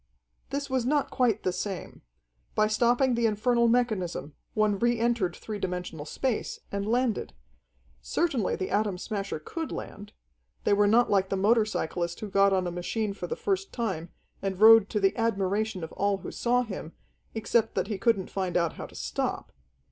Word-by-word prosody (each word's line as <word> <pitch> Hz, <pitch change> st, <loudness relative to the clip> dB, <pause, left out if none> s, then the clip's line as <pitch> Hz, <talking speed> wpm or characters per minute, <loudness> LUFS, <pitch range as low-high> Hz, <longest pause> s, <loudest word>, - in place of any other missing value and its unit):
This 280 Hz, 0 st, -3 dB
was 260 Hz, -2 st, 0 dB
not 285 Hz, +3 st, +1 dB
quite 240 Hz, -5 st, +1 dB
the 185 Hz, -, 0 dB
same. 190 Hz, 0 st, -5 dB, 0.5 s
By 215 Hz, -, +4 dB
stopping 240 Hz, +4 st, +3 dB
the 235 Hz, -1 st, +2 dB
infernal 235 Hz, +3 st, +2 dB
mechanism, 215 Hz, -11 st, 0 dB, 0.2 s
one 210 Hz, -2 st, +2 dB
re 240 Hz, +1 st, +2 dB
entered 230 Hz, -7 st, +1 dB
three 215 Hz, -2 st, -6 dB
dimensional 180 Hz, -5 st, -4 dB
space, 245 Hz, -, -2 dB
and 200 Hz, 0 st, -2 dB
landed. 240 Hz, 0 st, 0 dB, 0.7 s
Certainly 275 Hz, -, 0 dB
the 185 Hz, -, -4 dB
Atom 205 Hz, -2 st, +1 dB
Smasher 200 Hz, -1 st, -3 dB
could 320 Hz, -, -5 dB
land. 205 Hz, 0 st, -7 dB, 0.5 s
They -, -, +3 dB
were 205 Hz, 0 st, +4 dB
not 235 Hz, +4 st, +4 dB
like 195 Hz, -1 st, +3 dB
the 195 Hz, -, 0 dB
motorcyclist 190 Hz, -5 st, +1 dB
who 210 Hz, -2 st, -5 dB
got 200 Hz, 0 st, +4 dB
on 190 Hz, -1 st, +1 dB
a 175 Hz, -, -2 dB
machine 200 Hz, +4 st, -2 dB
for -, -, -6 dB
the 475 Hz, -, -3 dB
first 395 Hz, -4 st, -1 dB
time, 190 Hz, -9 st, -3 dB, 0.3 s
and 195 Hz, -1 st, -3 dB
rode 220 Hz, -1 st, +8 dB
to 210 Hz, -, 0 dB
the 195 Hz, -1 st, +2 dB
admiration 210 Hz, -3 st, 0 dB
of 160 Hz, -, -6 dB
all 200 Hz, 0 st, 0 dB
who -, -, -7 dB
saw 245 Hz, +1 st, +1 dB
him, 190 Hz, -7 st, -7 dB, 0.4 s
except 225 Hz, +1 st, +1 dB
that 190 Hz, -, +1 dB
he 205 Hz, -1 st, -4 dB
couldn't 215 Hz, -4 st, +1 dB
find 185 Hz, -3 st, -1 dB
out 170 Hz, -2 st, +1 dB
how -, -, -6 dB
to -, -, -17 dB
stop. -, -, -3 dB
210 Hz, 180 wpm, -28 LUFS, 190-235 Hz, 0.7 s, rode